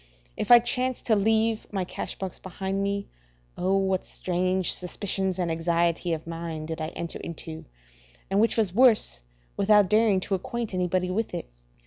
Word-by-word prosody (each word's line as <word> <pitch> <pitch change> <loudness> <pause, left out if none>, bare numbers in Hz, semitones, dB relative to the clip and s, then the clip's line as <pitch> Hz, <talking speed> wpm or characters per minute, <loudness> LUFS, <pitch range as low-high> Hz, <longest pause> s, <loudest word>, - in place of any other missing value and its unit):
If - - -3
I 240 - +11
chanced 250 +2 -1
to 225 - +4
leave 220 +2 +1
my 195 -3 -1
cash - - -5
box 190 -2 -5
behind 190 +1 -3
me, 200 0 -1 0.5
O, 190 +2 +1
what 190 -1 +1
strange 185 0 0
suspicions 190 0 -2
and 175 -2 -1
anxiety 170 +1 +1
of 160 -1 -2
mind 165 -1 -5
did 160 0 -4
I 155 - -1
enter 170 - -5
into, 160 -1 -7 0.6
and, 195 +1 +1
which 230 - +2
was 210 -6 +1
worse, 230 - +4 0.4
without 205 -1 +4
daring 215 -3 +4
to 195 - -3
acquaint 225 +4 -3
anybody 180 0 0
with 210 -1 -2
it. 170 - -6
190 Hz, 165 wpm, -26 LUFS, 175-210 Hz, 0.6 s, I